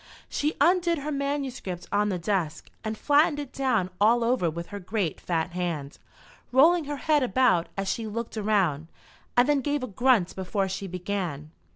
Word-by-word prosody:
She 300 +1 -1
undid 345 -1 +3
her 295 +1 -4
manuscript 275 - -3
on 210 +1 +2
the 185 - -1
desk, 170 -4 -2
and 220 0 -3
flattened 295 +3 +3
it 285 -3 -6
down 225 -9 0
all 230 +3 +5
over 230 -8 +2
with 170 +2 -6
her 205 - -6
great 190 -2 -2
fat 170 0 -1
hand, 170 -5 -4 0.5
rolling 315 +6 +5
her 290 0 -4
head 300 0 +2
about 250 -9 +2
as 195 0 -2
she 225 +2 -2
looked 230 +2 -5
around, 195 -8 +1 0.5
and 245 +2 +6
then 290 -2 +3
gave 290 0 -1
a - - -2
grunt 230 -3 +2
before 195 +1 -1
she 195 +1 -4
began. 180 -5 -4
215 Hz, 175 wpm, -26 LUFS, 180-275 Hz, 0.5 s, and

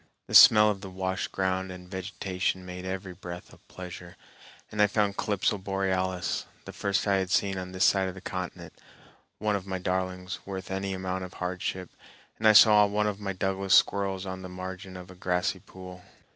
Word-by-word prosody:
The - - -10
smell 105 -1 +9
of 100 -2 -6
the 95 - -7
washed 95 +1 -3
ground 95 0 -1
and 90 -1 -10
vegetation 95 0 -3
made 90 0 -7
every 95 0 -5
breath 90 0 -9
a - - -17
pleasure, 90 -1 -10 0.5
and 105 - 0
I 105 - +6
found 105 -1 0
Calypso 105 -1 0
borealis, 95 -2 -1 0.2
the - - -8
first 100 -1 -1
I 100 -1 +3
had 95 -1 -1
seen 100 0 +1
on 90 0 -7
this 95 +1 +2
side 95 -1 +3
of 95 - -6
the - - -8
continent, 90 -1 -6 0.6
one 105 0 0
of 100 -1 -5
my 95 -1 -2
darlings, 90 0 -3
worth 95 -1 -7
any 95 0 -2
amount 95 0 -3
of 90 - -12
hardship; 90 0 -4 0.5
and 110 - +3
I 110 - +8
saw 105 -1 +8
one 105 +1 0
of 105 -1 -2
my 100 -2 -3
Douglas 95 +1 +1
squirrels 95 -1 +2
on 95 0 -6
the 95 - -8
margin 95 +1 -7
of 90 0 -11
a - - -13
grassy 90 -1 -1
pool. 90 -1 -12
95 Hz, 195 wpm, -28 LUFS, 90-100 Hz, 0.6 s, smell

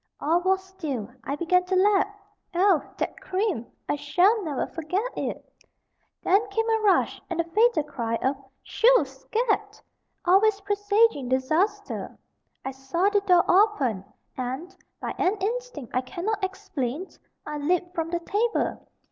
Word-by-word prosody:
All 330 +4 +2
was 380 +1 +1
still 310 - -5 0.2
I 280 - -2
began 350 +4 +2
to 375 +1 0
lap. 400 +1 +4 0.5
Oh! 365 -4 +4 0.2
that - - -3
cream! 375 - -1 0.2
I - - 0
shall 365 +9 +3
never 300 -5 -2
forget 370 +10 -3
it! - - -4 0.8
Then 405 +3 +3
came 450 +3 0
a 445 - +3
rush, 405 -3 +2
and 345 -2 -3
the - - +3
fatal 395 0 +3
cry 235 -6 -3
of 265 +4 0 0.3
"Shoo! 480 -8 +4
scat!" 425 - -2 0.5
always 400 +3 +4
presaging 410 - +2
disaster. 345 +11 0 0.5
I 265 - -2
saw 270 +9 0
the 410 -1 +2
door 360 -3 +4
open, 345 - +3 0.3
and, 265 +9 -5 0.2
by - - -4
an 375 +3 +2
instinct 470 - -4
I 255 - +3
cannot 390 +10 -3
explain, 330 -5 -3 0.4
I 300 0 -4
leaped 350 +4 0
from 330 -3 -2
the 345 0 -2
table. 435 +6 -1
365 Hz, 145 wpm, -26 LUFS, 290-410 Hz, 0.8 s, lap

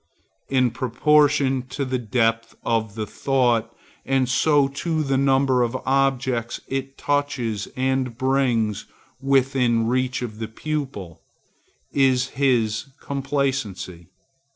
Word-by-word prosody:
In 130 -3 +2
proportion 135 +2 +2
to 140 +1 -3
the 130 -1 -1
depth 115 0 0
of 110 -2 -1
the 110 -1 -3
thought, 125 -1 +1 0.3
and 135 -1 +1
so 145 +2 +3
to 155 +3 -2
the 135 -2 0
number 135 -1 +3
of 120 0 0
the 130 - -4
objects 130 -3 0
it 135 0 -4
touches 135 -7 -1
and 130 -2 0
brings 125 -5 0 0.3
within 130 -4 +2
reach 130 +1 0
of 110 -3 -6
the 110 - -3
pupil, 110 - -5 0.7
is 130 -2 +3
his 115 -6 +1
complacency. 135 - -3
130 Hz, 115 wpm, -23 LUFS, 115-135 Hz, 0.7 s, so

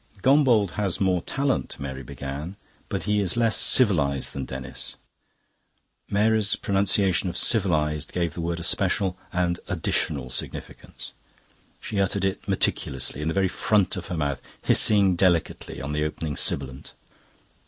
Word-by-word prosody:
"Gombauld 130 - +3
has 100 -4 -1
more 95 -3 +1
talent," 135 +6 -2
Mary 65 -1 -6
began, 70 +7 -7 0.3
"but 100 -3 -3
he 105 0 0
is 100 +2 -1
less 115 -2 +2
civilised 80 - +3
than 70 -1 -5
Denis." 65 -1 -6 1.1
Mary's 105 0 +2
pronunciation 95 -2 +2
of - - -4
"civilised" 75 - +2
gave 85 -3 -2
the 85 - -5
word 85 +1 -3
a - - -7
special 95 +1 0 0.2
and 90 -1 -1
additional 70 -5 -2
significance. - - -7 0.7
She 100 -2 -3
uttered 95 0 0
it 95 - -3
meticulously, 75 - 0
in 75 - -3
the 80 - -2
very 95 -1 +2
front 100 0 +1
of 90 - -7
her 90 - -4
mouth, 70 -3 -2 0.2
hissing 100 -4 +6
delicately 85 -2 0
on 70 +2 -5
the 75 0 -1
opening 75 -1 -4
sibilant. 65 -2 -2
90 Hz, 145 wpm, -24 LUFS, 75-100 Hz, 1.1 s, hissing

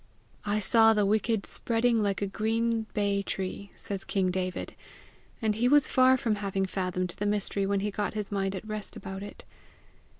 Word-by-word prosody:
"I 205 +1 +1
saw 225 +2 +5
the 210 -1 +3
wicked 215 +1 +1
spreading 230 0 +1
like 200 -1 0
a - - +2
green 225 +2 -1
bay 200 -1 +1
tree," 195 +1 -4
says 195 -1 -5
king 190 -2 0
David; 185 0 -3 0.7
and 215 -1 +2
he 230 +4 +1
was 290 +2 +5
far 260 0 +5
from 225 -4 0
having 195 -1 -1
fathomed 185 -1 -2
the 205 - 0
mystery 200 -1 -1
when 200 0 +1
he 210 +1 -1
got 205 +1 -3
his 210 -1 -3
mind 195 -1 -1
at 190 - -6
rest 215 -1 -5
about 190 0 -7
it. 205 - -9
205 Hz, 180 wpm, -28 LUFS, 195-220 Hz, 0.7 s, saw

